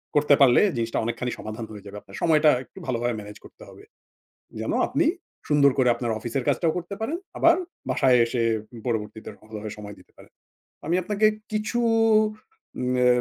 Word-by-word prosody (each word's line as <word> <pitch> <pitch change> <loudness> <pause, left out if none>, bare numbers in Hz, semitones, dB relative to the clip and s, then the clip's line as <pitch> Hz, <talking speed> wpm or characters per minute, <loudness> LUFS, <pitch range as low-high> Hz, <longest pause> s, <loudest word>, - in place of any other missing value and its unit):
করতে 145 0 +4
পারলে 125 -3 +6 0.2
জিনিসটা 115 0 -2
অনেকখানি 120 +1 -2
সমাধান 110 +1 -6
হয়ে 105 -2 -10
যাবে। 100 0 -9
আপনার 95 - -12
সময়টা 155 -2 +4
একটু 120 - -25
ভালোভাবে 120 -1 -1
ম্যানেজ 105 0 -10
করতে - - -15
হবে। - - -15 0.8
যেন - - -2 0.2
আপনি - - +1 0.4
সুন্দর 145 -2 +5
করে 130 -2 +4
আপনার 120 -1 -2
অফিসের 120 +3 -3
কাজটাও 165 -2 +2
করতে 180 +3 -6
পারেন। 285 +10 -2 0.2
আবার 335 0 +5 0.3
বাসায় 130 -2 +4
এসে 115 0 -1 0.3
উম 115 - -10
পরবর্তীতে 110 -2 -3
ভালোভাবে 110 0 -8
সময় 105 -1 -8
দিতে - - -21
পারেন। - - -17 0.5
আমি 165 - 0
আপনাকে 210 +3 +1 0.3
কিছু 215 +3 -1 1.0
উম 125 0 0
আ - - +4
125 Hz, 170 wpm, -25 LUFS, 110-155 Hz, 1.0 s, পারলে